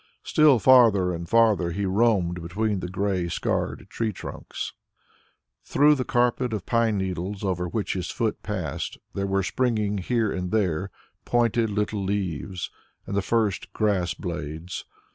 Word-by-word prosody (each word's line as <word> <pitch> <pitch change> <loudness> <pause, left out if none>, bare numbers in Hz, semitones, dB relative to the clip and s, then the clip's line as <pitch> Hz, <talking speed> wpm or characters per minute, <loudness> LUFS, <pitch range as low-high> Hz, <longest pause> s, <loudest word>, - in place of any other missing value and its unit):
Still 150 -4 +5
farther 110 -7 +5
and 85 0 -6
farther 110 -6 +4
he 100 +4 -2
roamed 95 -4 +2
between 100 +4 -1
the 90 - -4
grey 95 -1 -1
scarred 85 - -2
tree 115 -2 -2
trunks. - - -6 0.9
Through 150 +2 +4
the 135 -3 0
carpet 125 0 +1
of 105 -4 -3
pine 115 -3 +2
needles 95 +1 -3
over 90 -2 -1
which 105 +4 -2
his 90 -3 -3
foot - - -1
passed, - - -4 0.2
there 100 0 -2
were 95 0 +1
springing 105 -2 0
here 110 +2 0
and 90 -1 -3
there 95 -3 0 0.3
pointed 120 -1 +2
little 105 0 -1
leaves 95 -2 -3 0.3
and 100 - -4
the 100 - +2
first 105 -2 0
grass 100 -5 +1
blades. 85 -1 -5
100 Hz, 145 wpm, -25 LUFS, 90-115 Hz, 0.9 s, Still